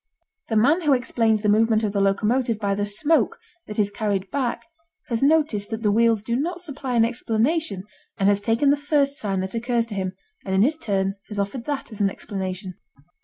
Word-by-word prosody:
The 225 - 0
man 280 +11 +4
who 300 -4 +3
explains 230 -3 +1
the 210 - 0
movement 220 +1 +3
of 210 - 0
the 200 0 0
locomotive 220 +4 +1
by 200 -2 -1
the 205 +1 -1
smoke 300 - +2 0.3
that 210 - -7
is 205 -1 +1
carried 200 -3 -2
back 260 -4 -2 0.4
has 230 -2 -1
noticed 280 -8 +2
that 225 0 -4
the 210 - +3
wheels 225 -1 +3
do 235 +1 -1
not 340 +7 -2
supply 280 -7 -4
an 225 -1 +5
explanation 235 - -1 0.3
and 195 - +2
has 205 0 +3
taken 230 +6 +2
the 290 - +2
first 285 -1 +1
sign 195 -3 -1
that 190 0 -4
occurs 235 0 0
to 230 - -7
him 190 -2 -3 0.3
and 190 -1 -2
in 190 - +5
his 295 +6 +2
turn 195 -8 -1
has 210 - -7
offered 200 +5 -3
that 285 -4 -4
as 215 - -6
an 200 - +3
explanation. 190 -1 -5
225 Hz, 210 wpm, -23 LUFS, 200-265 Hz, 0.4 s, an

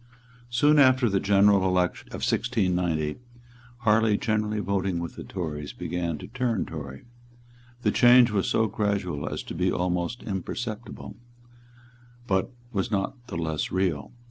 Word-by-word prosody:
Soon 145 +5 +4
after 130 -2 +5
the 100 -2 +1
general 100 0 +4
election 90 -1 0
of - - -4
1690, 90 -9 0 0.6
Harley, 110 -1 +3
generally 105 -2 -1
voting 95 -3 -1
with 85 0 -5
the - - -7
Tories, 75 -5 -5
began 85 -3 -3
to - - -9
turn 120 -3 -1
Tory. 70 -4 -8 0.8
The - - +3
change 120 -1 +6
was 100 -3 0
so 110 - +2
gradual 100 -8 -1
as - - -4
to - - -7
be 90 +2 +1
almost 90 +6 -1
imperceptible; 110 +3 -5 1.1
but 95 +1 0 0.2
was 95 -3 -1
not 110 +4 -3
the 85 - -5
less 80 -2 -2
real. 90 -6 -1
100 Hz, 140 wpm, -26 LUFS, 90-110 Hz, 1.1 s, change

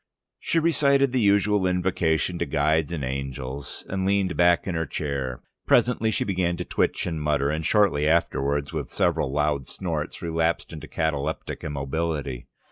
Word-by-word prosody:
She - - -1
recited 140 -5 +3
the 130 - +1
usual 100 -1 +3
invocation 90 -2 0
to 85 - -1
guides 75 +2 +1
and 80 -5 -3
angels, 65 +1 -5
and 95 0 -2
leaned 95 -1 +1
back 85 0 +4
in 95 - -2
her 80 -1 -1
chair. 70 -4 -3 0.2
Presently 120 -2 +3
she 110 - 0
began 90 -3 0
to 90 - -4
twitch - - 0
and 80 -3 -3
mutter, 75 -1 +1
and 80 +1 -2
shortly 90 -7 +3
afterwards 70 -3 +1
with - - -3
several - - +1
loud 75 -2 0
snorts, - - -4
relapsed 85 0 -1
into 75 -1 -8
cataleptic 75 -4 -2
immobility. 70 -2 -3
80 Hz, 155 wpm, -25 LUFS, 70-95 Hz, 0.2 s, back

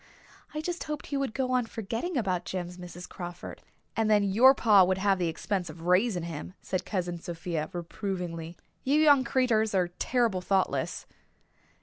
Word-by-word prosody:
I 305 - -3
just 350 +1 -4
hoped 300 -2 -4
he 280 - -2
would 275 -5 -2
go 260 -1 0
on 250 -2 +1
forgetting 230 - -3
about 185 -6 0
Jims, 180 0 -5
Mrs. 175 0 -9
Crawford." 175 -1 -8 0.3
"And 220 -1 +1
then 210 -1 +5
your 235 +8 +6
pa 210 -6 +6
would 185 +1 +1
have 195 -1 +2
the 175 - +1
expense 180 +2 -2
of 165 - -10
raising 180 +1 +2
him," 170 +2 -6
said 185 - -3
Cousin 175 -3 -2
Sophia 165 -2 -4
reprovingly. 175 -2 -5 0.3
"You 285 +3 +3
young 290 -4 +6
creeturs 225 -6 +2
are 180 -2 +2
terrible 225 +1 0
thoughtless." 190 +1 0
195 Hz, 165 wpm, -28 LUFS, 175-240 Hz, 0.3 s, your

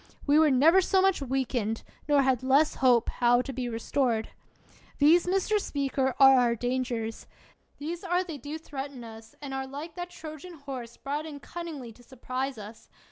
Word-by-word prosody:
We 290 +1 +5
were 315 -1 +5
never 310 +8 +5
so 380 +1 +2
much 385 -4 +2
weakened, 250 -4 -2 0.3
nor 285 -1 +5
had 260 -3 +2
less 275 +4 +3
hope 245 -3 +4
how 245 0 +2
to 270 - -6
be 250 -1 -3
restored! 230 0 -1 0.7
These, 325 +5 +5
Mr. 390 +3 +1
Speaker, 270 -6 -1
are 270 -1 +8
our 240 -1 +2
dangers; 245 -2 -3 0.5
these 330 +5 -5
are 360 0 +1
they 325 -6 -7
do 290 +5 -6
threaten 275 -4 -7
us, 225 -1 -12
and 275 -1 -5
are 265 0 -3
like 295 +5 -7
that 350 -1 -6
Trojan 330 0 -9
horse 265 -5 -8
brought 295 +3 -4
in 290 -2 -8
cunningly 310 -7 -7
to 245 - -19
surprise 255 +1 -5
us! 215 +1 -11
270 Hz, 175 wpm, -28 LUFS, 245-310 Hz, 0.7 s, are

